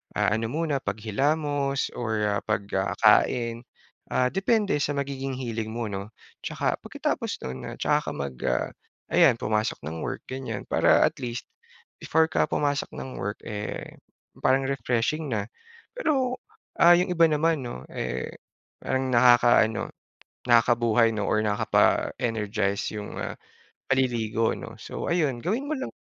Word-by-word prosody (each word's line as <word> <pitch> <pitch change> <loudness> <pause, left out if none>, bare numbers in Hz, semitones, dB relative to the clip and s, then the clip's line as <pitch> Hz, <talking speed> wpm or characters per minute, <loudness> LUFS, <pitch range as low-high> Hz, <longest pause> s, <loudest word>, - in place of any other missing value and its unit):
ah, 105 -1 +2
ano 115 - -2
muna 150 +1 -1
paghilamos 140 +7 -1
or 110 -3 -1
ah, 100 -1 +1
pag 105 -1 0
kakain, 115 +4 +2 0.5
ah, 125 0 +1
depende 205 +2 +2
sa 145 0 0
magiging 135 -1 -3
hilig 115 -4 -3
mo 115 +1 -3
'no, 100 +2 -5 0.3
saka - - -1
pagkatapos - - -2
nun 65 0 -6
ah, - - -7
saka - - +1
ka - - -3
mag 70 -2 -4
ah, - - 0 0.4
ayan 165 -8 +6
pumasok 110 0 0
ng 80 +1 -5
work - - -4
ganyan 130 -5 -5
para - - +4
at - - -1
least, 120 -1 -4 0.6
before 160 0 +2
ka - - +3
pumasok 145 -1 0
ng 130 - -7
work 105 +2 -3
eh, 105 -1 -6 0.4
parang 130 +1 +3
refreshing 135 +3 -1
na. 105 +1 -2 0.5
Pero 265 - +1 0.4
ah, 175 +1 +8
yung 180 +1 +1
iba 170 -1 +5
naman 155 0 +2
'no 65 - -6
eh, 65 +1 -3 0.5
parang 130 0 -1
nakaka-ano, 120 -2 +5 0.6
nakakabuhay 115 -1 +4
'no 105 -2 -2
or 110 - +2
nakakapa-energize 105 0 +1
yung 105 -1 -6
ah, - - -3 0.6
paliligo 120 -4 +1
'no? - - -8
So - - -6
ayun, 150 -8 +1
gawin 230 +10 -1
mo 310 - -2
lang. 265 - -3
120 Hz, 145 wpm, -26 LUFS, 110-145 Hz, 0.6 s, ah